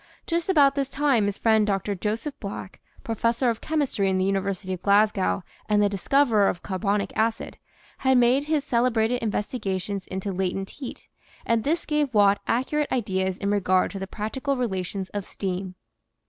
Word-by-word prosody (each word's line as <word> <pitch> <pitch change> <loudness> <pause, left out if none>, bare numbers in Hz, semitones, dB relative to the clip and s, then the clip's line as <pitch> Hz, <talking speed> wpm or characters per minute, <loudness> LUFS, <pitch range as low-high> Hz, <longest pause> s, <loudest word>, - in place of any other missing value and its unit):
Just 335 +1 -1
about 285 -6 +5
this 275 -1 -1
time 270 -7 +2
his 205 - -2
friend 220 -2 +3
Dr. 200 0 0
Joseph 220 +8 -3
Black, 200 -3 -7 0.2
Professor 230 +2 +1
of 225 - -6
Chemistry 285 -11 0
in 190 - +1
the 185 - +1
University 195 -1 -1
of 180 - -6
Glasgow 200 - +2 0.3
and 210 0 +3
the 205 0 +4
discoverer 215 +1 +3
of 175 - -2
carbonic 200 +1 -1
acid, 225 +1 -1 0.4
had 265 -1 +3
made 250 +4 +4
his 305 -2 0
cele 250 -3 +2
brated 230 +1 +1
investigations 205 -3 -3
into 190 +1 -4
latent 190 +1 -2
heat, 270 -3 -9 0.4
and 230 -1 +1
this 330 +4 0
gave 295 -5 0
Watt 200 -1 +5
accurate 285 +5 0
ideas 190 -6 -1
in 200 0 -1
regard 185 -2 +2
to 195 - -6
the 195 - -5
practical 260 +8 -3
relations 190 -4 -3
of 205 -1 -3
steam. 185 -1 -4
210 Hz, 170 wpm, -25 LUFS, 195-255 Hz, 0.4 s, about